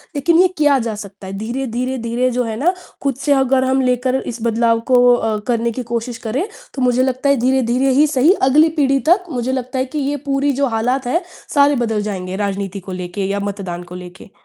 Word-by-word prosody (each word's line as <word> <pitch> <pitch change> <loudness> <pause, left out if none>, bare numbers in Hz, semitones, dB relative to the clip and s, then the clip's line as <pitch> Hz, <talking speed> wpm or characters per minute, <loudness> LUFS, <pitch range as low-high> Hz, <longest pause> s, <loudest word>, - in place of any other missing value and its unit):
लेकिन 330 +4 +3
ये 370 - +5
किया 290 -2 +4
जा 220 - -2
सकता 200 -2 -10
है, 190 - -6
धीरे-धीरे, 250 +3 -3
धीरे, 235 +2 -1
जो 250 +1 0
है 225 -1 -4
ना, 350 +6 +2 0.3
खुद 275 -3 0
से 290 - +2
अगर 265 -1 +2
हम 265 +1 +2
लेकर 250 0 +1 0.2
इस 230 - -9
बदलाव 230 0 +2
को 245 -1 +6
अ, 220 -2 -1
करने 235 -1 0
की 250 +2 -5
कोशिश 235 0 -3
करें, 265 +10 -1 0.3
तो 265 - -4
मुझे 250 0 +3
लगता 260 +2 0
है, 280 - +4
धीरे-धीरे 260 0 +2
ही 305 - +5
सही, 290 +5 +4 0.2
अगली 305 +4 +5
पीढ़ी 275 -1 +3
तक, 365 +1 +4
मुझे 250 0 -2
लगता 260 0 -3
है 260 - +1
कि - - 0
ये 285 +1 -1
पूरी 275 +1 +1
जो 275 - +3
हालात 250 +3 -1
हैं, 340 +8 +1 0.3
सारे 285 0 +5
बदल 220 -2 -1
जाएँगे, 190 -3 -4
राजनीति 195 0 -4
को 185 +1 -10
लेके 180 +2 -4
या 200 0 -1
मतदान 180 -3 -6
को - - -7
लेके। 180 +1 -11
250 Hz, 220 wpm, -18 LUFS, 220-270 Hz, 0.3 s, को